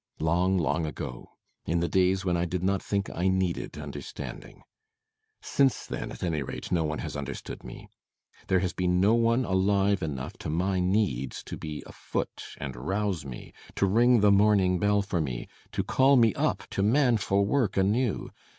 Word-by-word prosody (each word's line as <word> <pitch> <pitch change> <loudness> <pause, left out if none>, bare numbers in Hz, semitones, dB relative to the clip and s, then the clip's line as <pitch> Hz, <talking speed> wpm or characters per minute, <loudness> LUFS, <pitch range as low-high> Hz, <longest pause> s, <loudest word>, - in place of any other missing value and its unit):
Long, 90 +4 +2
long 80 -1 0
ago. 60 -5 -6 0.4
In 85 +2 +1
the 85 - 0
days 95 +1 +2
when 90 -2 +1
I 85 0 +1
did 90 +1 -3
not 95 0 +1
think 100 -1 -1
I 90 +2 -1
needed 95 -2 -1
understanding. - - -8 0.8
Since 135 -2 +2
then, - - -5
at - - -8
any 80 -4 0
rate, 65 - -6
no 85 -2 +2
one 75 0 -2
has - - -5
understood 70 -2 -6
me! - - -10 0.6
There 95 -1 +3
has 90 - -1
been 90 0 +1
no 100 +4 +4
one 115 +2 +3
alive 100 +1 +2
enough 70 -6 -4
to - - -5
my 90 +4 0
needs 90 - 0
to - - -6
be 75 -1 -6
afoot - - -5
and 65 -3 -5
rouse 95 +4 -2
me 65 - -9 0.2
to - - +2
ring 120 +4 +4
the 105 0 +5
morning 100 -3 +4
bell 105 0 +2
for 95 -4 -1
me 65 -5 -4 0.3
to - - 0
call 135 +1 +4
me 115 -5 +5
up - - 0
to - - -1
manful 110 -4 +3
work 110 -3 +1
anew. 105 +4 +1
95 Hz, 180 wpm, -28 LUFS, 85-105 Hz, 0.8 s, the